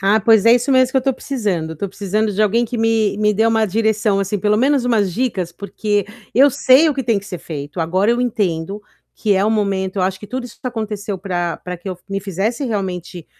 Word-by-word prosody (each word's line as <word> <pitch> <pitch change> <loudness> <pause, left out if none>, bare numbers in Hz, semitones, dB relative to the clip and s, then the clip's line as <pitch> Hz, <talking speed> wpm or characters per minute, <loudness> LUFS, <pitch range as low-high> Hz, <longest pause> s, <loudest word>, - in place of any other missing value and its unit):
Ah, 200 +3 +3
pois 220 -1 +4
é, 235 - +8
isso 245 +3 +1
mesmo 260 -1 +4
que - - 0
eu - - +7
estou 270 +1 +1
precisando. 205 - -2
Eu - - -6
estou 195 +5 -4
precisando 205 +2 -1
de 210 +3 +1
alguém 230 +3 +2
que 235 +1 -5
me 225 -2 +1
me 210 0 +3
dê 220 +2 +2
uma 225 -1 +2
direção, 215 0 +1
assim, 195 +1 -1
pelo 210 +1 +2
menos 270 +1 +2
umas 210 -7 +1
dicas, 195 -8 -2
porque 205 +1 -2 0.3
eu 275 +4 +6
sei 265 +5 +5
o 295 - 0
que 270 - -2
tem 225 -4 +2
que 200 - -11
ser 180 -4 -6
feito. 145 +1 -7
Agora, 185 +7 +1
eu 240 +1 +1
entendo 200 -5 -1 0.3
que 210 -3 +1
é 195 +2 +2
o 215 - +2
momento. 200 -3 -1
Eu 185 - +1
acho 190 0 -1
que 210 - -10
tudo 255 +3 -4
isso 245 - -12
aconteceu 215 -5 -4
para 175 -3 -2
para 180 0 -6
que 175 +3 -9
eu 185 - -3
f 175 - -23
me 195 0 -2
fizesse 205 - -2
realmente 180 - -4
210 Hz, 245 wpm, -19 LUFS, 190-230 Hz, 0.3 s, é